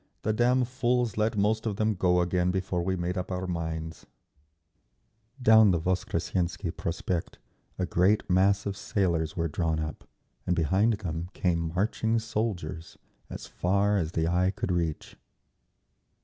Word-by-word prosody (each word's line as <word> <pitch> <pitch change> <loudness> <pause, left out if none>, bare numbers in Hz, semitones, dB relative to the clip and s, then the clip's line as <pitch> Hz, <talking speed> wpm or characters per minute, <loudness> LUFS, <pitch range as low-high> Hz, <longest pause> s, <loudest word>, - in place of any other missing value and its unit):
"The 110 - +1
damn 125 +3 +3
fools 125 -3 0
let 110 0 0
most 110 +3 +1
of 105 - -1
them 110 +1 +1
go 90 -2 +2
again 90 0 +1
before 95 -1 -1
we 95 +2 -1
made 90 +1 -2
up 90 +1 -5
our 90 0 -2
minds…." 80 -2 -4 1.3
Down 110 -4 +6
the 85 -3 +2
Voskressensky 90 0 -2
Prospect 85 +1 -3 0.4
a 95 - 0
great 95 +5 +2
mass 95 +2 +3
of 100 -1 -2
sailors 85 -6 -1
were 85 -1 0
drawn 80 0 -1
up, 75 -1 -6 0.4
and 90 - +2
behind 95 +8 +2
them 85 -3 -4
came 85 -3 0
marching 110 +3 +1
soldiers, 110 -7 -3 0.3
as - - -7
far 100 +3 +1
as 80 -1 -3
the 80 0 0
eye 90 +2 +2
could 95 -1 -3
reach. 85 -3 -2
90 Hz, 150 wpm, -28 LUFS, 85-105 Hz, 1.3 s, Down